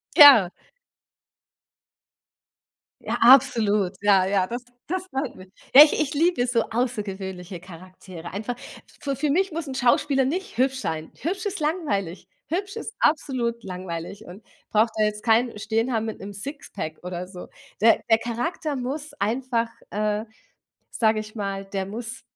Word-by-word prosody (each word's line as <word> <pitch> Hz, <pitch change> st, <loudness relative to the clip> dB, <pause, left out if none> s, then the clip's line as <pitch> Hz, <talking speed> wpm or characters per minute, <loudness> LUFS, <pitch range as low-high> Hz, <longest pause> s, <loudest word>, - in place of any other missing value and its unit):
Ja. 270 Hz, -11 st, +9 dB, 2.5 s
Ja, -, -, -2 dB
absolut. 215 Hz, -6 st, +5 dB
Ja, 200 Hz, -2 st, +4 dB
ja, 190 Hz, -1 st, +1 dB
das 240 Hz, +3 st, -5 dB, 0.2 s
das 370 Hz, +2 st, -2 dB
freut 270 Hz, -5 st, -3 dB
mich. 185 Hz, 0 st, -13 dB, 0.3 s
Ja, 285 Hz, -, +13 dB
ich 300 Hz, -, +1 dB
ich 305 Hz, 0 st, -1 dB
liebe 315 Hz, -4 st, +2 dB
so 235 Hz, -2 st, +2 dB
außergewöhnliche 195 Hz, -7 st, -3 dB
Charaktere. 185 Hz, -1 st, -11 dB
Einfach 220 Hz, +5 st, -3 dB, 0.5 s
fü 275 Hz, -1 st, -2 dB
für 295 Hz, +3 st, -1 dB
mich 375 Hz, +6 st, +2 dB
muss 325 Hz, -1 st, -4 dB
'n 265 Hz, -, -5 dB
Schauspieler 270 Hz, +1 st, +2 dB
nicht 355 Hz, +2 st, -3 dB
hübsch 265 Hz, +1 st, +1 dB
sein. 160 Hz, -7 st, -4 dB
Hübsch 370 Hz, +5 st, -3 dB
ist 405 Hz, -1 st, -3 dB
langweilig, 295 Hz, -, -2 dB, 0.2 s
hübsch 390 Hz, +5 st, -3 dB
ist 450 Hz, 0 st, -6 dB
absolut 250 Hz, -7 st, 0 dB
langweilig 180 Hz, +2 st, -6 dB
und 185 Hz, +5 st, -12 dB, 0.3 s
braucht 220 Hz, +1 st, +3 dB
da 215 Hz, -, +3 dB
jetzt 210 Hz, 0 st, -3 dB
keinen 230 Hz, 0 st, +2 dB
stehen 225 Hz, +4 st, 0 dB
haben 225 Hz, -1 st, 0 dB
mit 220 Hz, -, -5 dB
'nem 200 Hz, +1 st, -8 dB
Sixpack 200 Hz, -, -7 dB
oder 180 Hz, 0 st, -5 dB
so. 180 Hz, -1 st, -10 dB, 0.3 s
Der 225 Hz, 0 st, +5 dB
der 225 Hz, -, +6 dB
Charakter 260 Hz, +7 st, -3 dB
muss 280 Hz, +4 st, -4 dB
einfach 230 Hz, +2 st, 0 dB, 0.2 s
äh, 210 Hz, +1 st, -1 dB, 0.7 s
sage 220 Hz, -1 st, +2 dB
ich 215 Hz, +1 st, -8 dB
mal, 195 Hz, -2 st, -4 dB
der 195 Hz, -1 st, -3 dB
muss 230 Hz, +5 st, -7 dB
230 Hz, 150 wpm, -24 LUFS, 195-275 Hz, 2.5 s, Ja